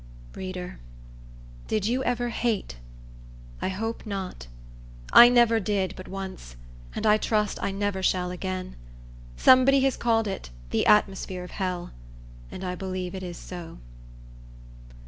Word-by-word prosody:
Reader, 185 -1 -6 0.9
did 215 -2 0
you 250 +4 0
ever 245 -1 0
hate? 225 - -2 0.8
I - - 0
hope 225 +4 -4
not. 190 - -5 0.7
I 240 0 +11
never 235 -2 +4
did 195 -3 -1
but 185 - -9
once; 190 - -7 0.4
and - - -3
I 210 0 +6
trust 210 -1 0
I - - 0
never 200 -1 -2
shall 180 -1 +1
again. 185 0 -5 0.6
Somebody 260 +1 +6
has 270 -1 +1
called 225 -2 +1
it 190 - -5 0.2
"the - - +1
atmosphere 190 -3 +2
of 180 - -10
hell;" 185 -3 -3 0.6
and - - -8
I 180 -1 -2
believe 185 0 -4
it 190 - -5
is 175 -2 -6
so. 175 -2 -9
195 Hz, 135 wpm, -26 LUFS, 185-225 Hz, 0.9 s, I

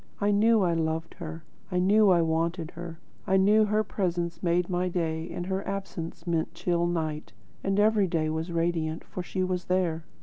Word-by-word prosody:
I 205 0 +2
knew 215 +1 +4
I 175 -2 +2
loved 160 0 -1
her; 165 -1 -7 0.3
I 180 - 0
knew 200 +3 +5
I 175 -2 +5
wanted 165 +1 -1
her; 170 -1 -8 0.3
I 190 - +4
knew 210 +3 +5
her 215 +1 +1
presence 175 -4 -2
made 175 0 +1
my 180 0 0
day 165 -2 -2
and 175 - -4
her 190 +1 -1
absence 190 -4 -5
meant 170 -1 -1
chill 170 0 0
night; 155 -7 -3 0.3
and 195 +1 +1
every 210 -2 +4
day 165 -2 0
was 160 +2 -3
radiant, 165 -1 -1
for 180 - -6
she 185 +1 -2
was 185 -1 -2
there." 175 -3 0
175 Hz, 190 wpm, -28 LUFS, 165-190 Hz, 0.3 s, knew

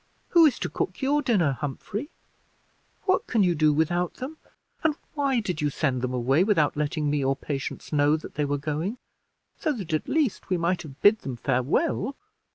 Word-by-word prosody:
Who 335 -2 +7
is 285 - 0
to - - -2
cook - - -3
your 290 +2 +3
dinner, 180 - +1
Humphrey? 200 - -4 0.9
What 375 -1 +1
can 225 -4 +3
you 180 -2 +3
do 155 -1 +3
without 170 +4 0
them, 275 +5 -6 0.5
and 315 -2 +2 0.2
why 280 -4 +1
did 180 -8 -3
you 150 - +2
send 135 -3 -1
them 130 0 -1
away 130 +6 +2
without 185 -8 +2
letting 150 +1 -1
me 145 -1 +1
or 135 +1 +2
Patience 140 +2 -5
know 145 +1 +4
that 155 - -10
they 150 - -1
were 145 0 0
going, 155 - -3 0.6
so 310 - +1
that 190 - -5
at 155 - -1
least 290 -7 0
we 185 - +2
might 175 +2 0
have 140 -5 -11
bid 210 +1 +6
them 130 - -5
farewell?" 140 - 0
165 Hz, 190 wpm, -26 LUFS, 145-235 Hz, 0.9 s, Who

